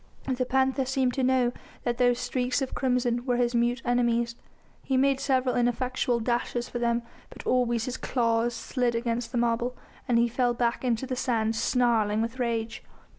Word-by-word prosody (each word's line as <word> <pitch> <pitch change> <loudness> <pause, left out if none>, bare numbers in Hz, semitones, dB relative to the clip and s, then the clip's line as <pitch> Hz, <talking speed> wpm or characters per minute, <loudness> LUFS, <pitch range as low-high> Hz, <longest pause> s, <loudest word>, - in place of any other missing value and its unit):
The 250 0 -1
panther 265 +1 +2
seemed 260 -1 +1
to 270 - -1
know 255 -1 +3 0.3
that 240 -1 -1
those 245 -1 +4
streaks 250 +1 -1
of 265 - -5
crimson 245 -2 0
were 245 -2 0
his 245 0 +1
mute 240 0 +1
enemies. 235 -1 +1 0.5
He 265 - 0
made 270 0 +3
several 260 -2 +1
ineffectual 245 0 0
dashes 240 +1 -1
for 240 - -5
them, 235 0 +1 0.3
but - - -12
always 240 -2 +1
his 255 - -4
claws 235 -1 0
slid 245 0 -1
against 235 0 -2
the 250 - -2
marble, 235 +1 0 0.3
and 240 - +3
he 235 +1 +4
fell 245 0 0
back 235 0 0
into 245 0 0
the 260 -1 -3
sand, 225 -3 0
snarling 225 -3 +2
with 230 +3 -3
rage. 230 -2 -2
245 Hz, 175 wpm, -27 LUFS, 235-255 Hz, 0.5 s, those